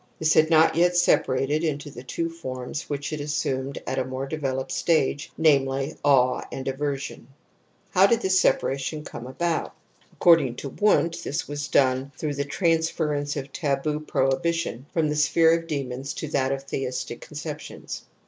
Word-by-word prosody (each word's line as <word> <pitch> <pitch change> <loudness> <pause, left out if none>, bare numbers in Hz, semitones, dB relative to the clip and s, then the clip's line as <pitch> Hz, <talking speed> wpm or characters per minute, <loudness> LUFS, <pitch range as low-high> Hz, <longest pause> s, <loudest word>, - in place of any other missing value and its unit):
This 155 -1 +2
had 155 0 +4
not 160 -1 +5
yet 175 +1 +3
separated 145 -2 +2
into 145 -2 -2
the 125 - -9
two 165 +6 -3
forms 130 -4 -6
which 145 +1 -3
it 150 - -3
assumed 140 -2 -2
at 130 0 -1
a - - +1
more 130 +1 -4
developed 135 -3 -3
stage, 155 -2 +1
namely, 140 -2 +2
awe 130 -3 +4
and 135 - -5
ayer^n. 140 -1 -3 0.7
How 190 +1 +6
did 235 +2 +2
this 190 -2 +3
separation 140 +3 0
come 125 -4 -8
about? 165 +5 -2 0.3
Ac - - -27
cording 160 -8 +5
to 140 - -6
Wundt, 170 -2 +2
this 145 +3 -3
was 145 0 -4
done 130 0 +2
through 150 -2 -2
the 140 0 -2
transference 155 -3 0
of 140 0 -5
taboo 150 0 -1
prohibitions 140 -1 -1
from 160 -2 +1
the 150 - -1
sphere 160 +2 +4
of 165 0 -4
demons 135 -2 -4
to 155 - -4
that 135 -2 +1
of 135 0 -2
theistic 135 -2 -4
conceptions. - - -7
145 Hz, 165 wpm, -25 LUFS, 135-160 Hz, 0.7 s, How